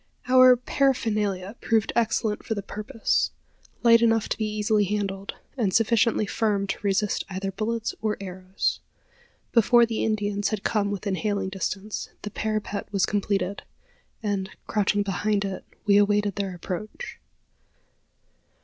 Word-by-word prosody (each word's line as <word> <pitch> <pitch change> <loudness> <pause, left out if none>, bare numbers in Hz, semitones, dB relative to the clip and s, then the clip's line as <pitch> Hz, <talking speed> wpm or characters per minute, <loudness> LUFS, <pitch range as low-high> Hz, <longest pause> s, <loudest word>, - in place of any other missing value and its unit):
Our 255 0 +8
paraphernalia 215 -6 0
proved 225 -3 +1
excellent 225 -2 +1
for 220 - -2
the 200 - -4
purpose 215 +4 -1 0.5
light 230 -1 +7
enough 225 -2 +3
to - - -1
be 215 - 0
easily 210 0 +1
handled, 195 -1 -3 0.2
and 220 -8 +1
sufficiently 225 -1 +3
firm 205 -1 0
to 195 - -3
resist 200 0 +1
either 195 0 -3
bullets 225 +3 -2
or 215 -1 0
arrows. 185 0 -2 0.7
Before 235 +1 +5
the 225 -1 -2
Indians 205 -2 0
had 215 -2 -3
come 205 -2 +1
within 200 0 -2
hailing 200 0 -1
distance, 195 +2 -4
the 210 - -5
parapet 215 -1 -3
was 195 -2 +2
completed; 200 -2 -1 0.6
and, 200 -2 -1 0.2
crouching 205 -1 +1
behind 200 +1 0
it, 195 -1 -5 0.2
we 200 -1 +5
awaited 205 0 +3
their 195 -2 -3
approach. 205 - -6
210 Hz, 135 wpm, -25 LUFS, 195-220 Hz, 0.7 s, Our